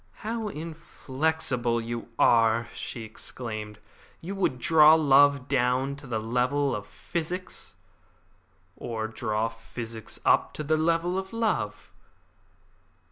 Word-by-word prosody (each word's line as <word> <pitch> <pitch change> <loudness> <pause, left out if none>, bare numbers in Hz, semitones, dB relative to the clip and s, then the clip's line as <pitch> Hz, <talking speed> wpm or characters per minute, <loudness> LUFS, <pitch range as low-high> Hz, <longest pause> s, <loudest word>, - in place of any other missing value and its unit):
"How 225 0 -2
inflexible 155 - -2
you 115 0 -5
are!" 115 0 +4
she 115 - -6
exclaimed; 110 -1 -6 0.4
"you 180 +4 -6
would 190 -10 0
draw 155 +4 +7
love 140 -3 +5
down 130 +1 +1
to 145 -1 -12
the 115 -2 -2
level 125 +4 0
of 105 0 -6
physics." 175 +2 -5 1.0
"Or 110 -2 -4
draw 110 0 -1
physics 115 0 -6
up - - +3
to 150 - -3
the 155 +2 +2
level 165 +3 +1
of 190 0 -7
love." 230 -1 -1
130 Hz, 115 wpm, -27 LUFS, 115-160 Hz, 1.0 s, draw